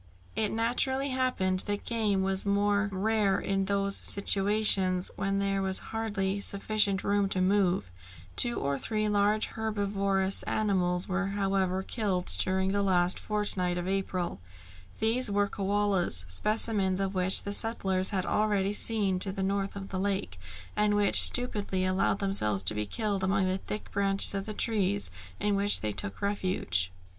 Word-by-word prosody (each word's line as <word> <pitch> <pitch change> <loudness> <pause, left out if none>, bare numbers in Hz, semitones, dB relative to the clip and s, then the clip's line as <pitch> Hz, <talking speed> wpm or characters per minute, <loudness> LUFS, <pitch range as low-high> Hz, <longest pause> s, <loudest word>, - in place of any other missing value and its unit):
It 215 - 0
naturally 260 +4 0
happened 255 -8 0
that 205 0 -3
game 210 -5 0
was 190 0 +1
more 205 0 +1
rare 200 0 0
in 195 0 -1
those 200 0 -1
situations 195 -2 +3
where 195 0 -2
there 195 0 0
was 190 -1 -1 0.2
hardly 205 -3 -2
sufficient 200 -1 +1
room 200 -1 +1
to 190 - 0
move; 185 - +1 0.4
two 240 - +3
or 140 0 -2
three 215 -1 -2
large 210 +1 +1
herbivorous 200 -3 0
animals 180 -4 0
were 195 0 -1
however 195 -1 -1
killed 190 -5 -2
during 190 0 0
the 200 0 0
last 180 -2 +2
fortnight 195 -4 0
of 175 0 -4
April. 190 - -3 0.6
These 230 +2 +1
were 205 0 +1
koalas, 195 - +1
specimens 195 - 0
of 195 0 -2
which 185 0 +1
the 200 - -4
settlers 195 -4 0
had 190 -3 -2
already 205 -2 0
seen 210 -4 0
to 190 +1 0
the 190 0 -4
north 195 +1 -2
of 195 -1 -7
the 190 - -4
lake, 195 - -3 0.4
and 210 0 +1
which 205 -1 +6
stupidly 205 -6 +3
allowed 185 +1 +1
themselves 105 - -1
to 95 - +3
be 105 0 -3
killed 205 - -2
among 195 0 +1
the 185 +1 -1
thick 210 - -7
branches 195 0 +1
of 195 +1 -4
the 215 - -6
trees 205 - -1 0.3
in 205 -1 0
which 200 +1 +2
they 105 - -2
took 100 - -2
refuge. 185 - -1
195 Hz, 155 wpm, -28 LUFS, 190-205 Hz, 0.6 s, which